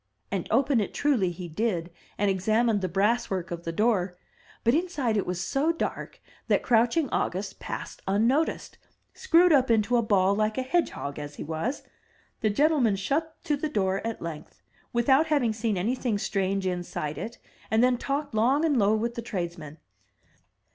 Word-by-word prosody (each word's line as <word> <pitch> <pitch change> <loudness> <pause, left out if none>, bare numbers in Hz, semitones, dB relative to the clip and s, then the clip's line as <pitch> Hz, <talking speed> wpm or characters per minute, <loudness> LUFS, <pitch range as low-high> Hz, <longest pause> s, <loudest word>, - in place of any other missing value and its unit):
And 195 -3 -2
open 260 +1 +3
it 200 - -4
truly 250 -11 +2
he 175 0 -7
did, 175 -1 -2 0.3
and 205 - +1
examined 215 +3 +2
the 185 - -1
brass 210 +7 +1
work 185 -2 -3
of 170 0 -6
the 165 - -2
door; 185 -2 +1 0.5
but 235 - +3
inside 300 -8 0
it 205 - 0
was 180 -1 -2
so 275 - +1
dark 330 - -4 0.3
that - - +2
crouching 245 +6 +3
August 190 +2 -2
passed - - -6
unnoticed, 235 +11 +1 0.3
screwed 345 0 +4
up 265 -3 +4
into 230 +2 +3
a - - +3
ball 200 -3 +3
like 215 +1 0
a 260 - 0
hedgehog 255 - -1
as 145 0 -7
he - - -6
was. 165 - -3 0.6
The 215 - +1
gentleman 270 -2 +3
shut 300 +12 -2
to 305 -3 +1
the 300 +2 -3
door 195 -7 0
at 230 -4 -4
length, 165 -3 -8 0.3
without 265 +6 +3
having 275 -8 +2
seen 220 -2 -1
anything 230 +3 0
strange 195 -1 -1
inside 175 -5 -3
it; 230 +7 -6 0.3
and 220 +2 +3
then 250 -1 +3
talked 280 0 -2
long 260 +8 +3
and 290 -6 +2
low 210 +1 +4
with 230 +2 -1
the 235 - -5
tradesmen. 170 -8 -5
220 Hz, 175 wpm, -27 LUFS, 190-260 Hz, 0.6 s, screwed